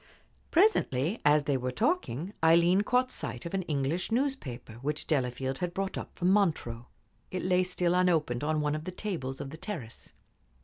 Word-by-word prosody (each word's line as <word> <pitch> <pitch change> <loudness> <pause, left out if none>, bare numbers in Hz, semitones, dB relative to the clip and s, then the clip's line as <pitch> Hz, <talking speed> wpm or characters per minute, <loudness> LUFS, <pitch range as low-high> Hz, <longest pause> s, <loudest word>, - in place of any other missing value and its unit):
Presently, 220 - +2
as 150 0 +5
they 145 -2 +1
were 125 0 -2
talking, 200 - -1
Aileen 170 +4 +5
caught 250 +4 +1
sight 125 - -5
of 170 - -5
an 195 - +1
English 160 +3 -1
newspaper 150 - -2
which 150 +2 -2
Delafield 130 -2 -1
had 175 -1 -3
brought 195 0 -2
up - - -7
from 180 +1 +2
Montreux. 150 - +1 0.4
It 185 - -4
lay 180 0 +3
still 180 -1 0
unopened 165 -9 +2
on 155 0 +1
one 150 0 0
of 155 +1 -4
the 185 - -4
tables 165 -10 -4
of 135 - -6
the 160 - -8
terrace. 160 - -7
165 Hz, 175 wpm, -30 LUFS, 135-185 Hz, 0.4 s, as